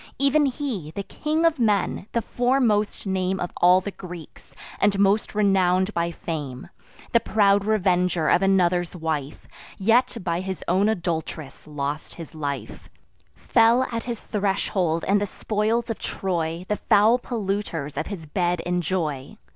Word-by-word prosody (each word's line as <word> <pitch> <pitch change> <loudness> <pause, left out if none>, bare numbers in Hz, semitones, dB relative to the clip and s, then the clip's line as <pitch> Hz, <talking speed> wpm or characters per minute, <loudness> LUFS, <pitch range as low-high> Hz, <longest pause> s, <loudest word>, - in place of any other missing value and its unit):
Ev'n 280 +1 +3
he, 250 - -4
the 200 +5 -5
King 305 +10 -1
of 330 -4 +2
Men, 205 -3 +1
the 235 - 0
foremost 245 -5 +1
name 190 -1 -1
Of 175 - -3
all 180 +1 +5
the 205 - -5
Greeks, 170 -7 -11 0.2
and 200 -1 +2
most 200 +2 +2
renown'd 190 -1 +2
by 170 0 0
fame, 150 -6 -6 0.4
The 235 - +5
proud 200 -3 +2
revenger 180 -5 +1
of - - +4
another's 180 -2 +2
wife, 155 -4 -4 0.3
Yet 235 +5 +2
by 170 -1 -1
his 190 0 -5
own 190 +4 +3
adult'ress 160 -8 -4
lost 145 0 -4
his 165 -1 -9
life; 145 -3 -5 0.5
Fell 230 +2 +3
at 230 -1 -3
his 235 -3 -5
threshold; 190 -5 -1
and 200 +1 +3
the 205 - 0
spoils 220 +4 -1
of 225 - -5
Troy 170 -2 -3
The 210 - -1
foul 220 +4 +4
polluters 195 - -3
of - - -3
his 185 -6 -6
bed 175 +3 0
enjoy. 175 -2 -2
190 Hz, 145 wpm, -24 LUFS, 170-215 Hz, 0.5 s, all